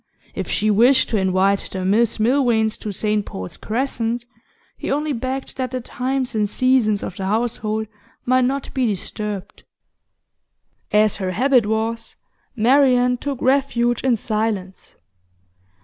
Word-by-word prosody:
If - - -4
she 215 0 +1
wished 245 +6 +4
to 220 - 0
invite 190 +1 +1
the 185 -1 -4
Miss 220 +4 +2
Milvains 230 -2 +2
to 210 - -5
St 210 +1 0
Paul's 95 - -7
Crescent, 235 0 -2 0.5
he - - -6
only 295 +1 0
begged 260 +3 -4
that 260 -1 -2
the 255 +1 -3
times 255 +1 -3
and 210 -2 0
seasons 245 -4 +2
of 185 - -6
the 190 - -3
household 220 0 -1 0.4
might 255 0 +3
not 275 +2 -2
be 260 -2 +1
disturbed. 205 0 -5 1.3
As 210 0 +3
her 190 -2 -2
habit 245 +3 +3
was, 225 +1 -2 0.4
Marian 250 +1 +4
took 275 0 -4
refuge 250 -3 +2
in 260 -2 +2
silence. 210 -4 -3
230 Hz, 135 wpm, -21 LUFS, 210-255 Hz, 1.3 s, wished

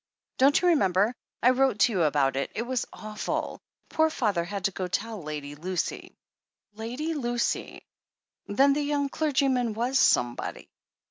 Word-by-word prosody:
Don't 275 +3 +5
you 360 - +3
remember? 205 - +3 0.3
I 250 - +7
wrote 260 -3 +2
to 245 - +5
you 190 -5 0
about 145 -4 +2
it. 140 - -1
It 230 - -1
was 250 0 -2
awful. 215 -1 -4 0.3
Poor 315 0 +2
father 210 - 0
had 195 +2 -5
to 195 - +2
go 185 0 -4
and 180 - -9
tell 220 -2 -2
Lady 150 -2 -6
Lucy." 175 +4 -4 0.6
"Lady 245 +9 -4
Lucy!" 240 -5 -2 0.6
Then 275 +7 +4
the 295 - 0
young 285 -1 0
clergyman 265 -6 +1
was 250 +4 +1
"somebody." 120 0 +1
230 Hz, 155 wpm, -27 LUFS, 185-270 Hz, 0.6 s, I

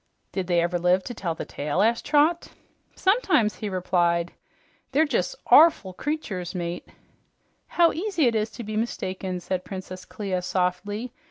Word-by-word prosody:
"Did 190 -2 -3
they 175 -2 +3
ever 175 +1 0
live 180 +2 +3
to 245 - -6
tell 175 -7 -3
the - - -6
tale?" 150 +7 -1
asked 230 +2 +1
Trot. 310 +3 +3 0.5
"Sometimes," 380 - +2
he 210 - -4
replied. 175 -2 0 0.6
"They're 305 +4 +4
jes' 230 -6 -1 0.2
ORful 290 - +6
creatures, 200 - -4
mate." 175 0 -4 0.8
"How 340 -1 +4
easy 350 -3 0
it 235 - +3
is 215 0 0
to 240 - -7
be 215 0 -5
mistaken," 190 -4 -3
said 180 +1 -3
Princess 185 -1 -7
Clia 185 0 -3
softly. 195 +6 -2
190 Hz, 155 wpm, -25 LUFS, 180-245 Hz, 0.8 s, ORful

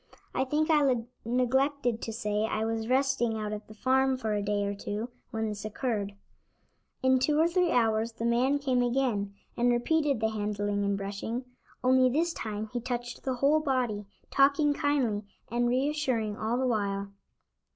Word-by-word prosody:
I 260 - +1
think 310 +4 +1
I 285 -4 +4 0.3
neglected 255 0 +1
to 225 - -4
say 210 -2 -1
I 220 0 -1
was 225 0 -2
resting 255 -3 +1
out 215 -1 -3
at 210 0 -7
the 215 - -12
farm 265 +3 +2
for 220 -4 -2
a 205 - 0
day 205 0 0
or 200 - -1
two 205 +3 -4 0.2
when 220 -2 -2
this 210 0 -5
occurred. 215 -2 -2 0.9
In 260 0 +4
two 295 +3 +2
or 325 - +5
three 355 0 +2
hours 225 -1 +2
the 230 0 -4
man 250 +4 +3
came 260 -3 +1
again, 240 -5 0 0.2
and 245 +1 +2
repeated 280 +2 +1
the 220 0 +1
handling 205 -1 -1
and 200 0 0
brushing, 205 +5 -4 0.4
only 255 0 +5
this 330 +6 +1
time 215 -4 -4
he 245 - -1
touched 245 0 -4
the 260 -1 -2
whole 280 +5 +3
body, 250 -8 -1 0.2
talking 285 +2 +4
kindly 275 -9 0 0.3
and 240 0 +1
reassuring 255 -5 0
all 220 +3 -1
the 260 - 0
while. 200 -4 -1
240 Hz, 170 wpm, -29 LUFS, 215-265 Hz, 0.9 s, or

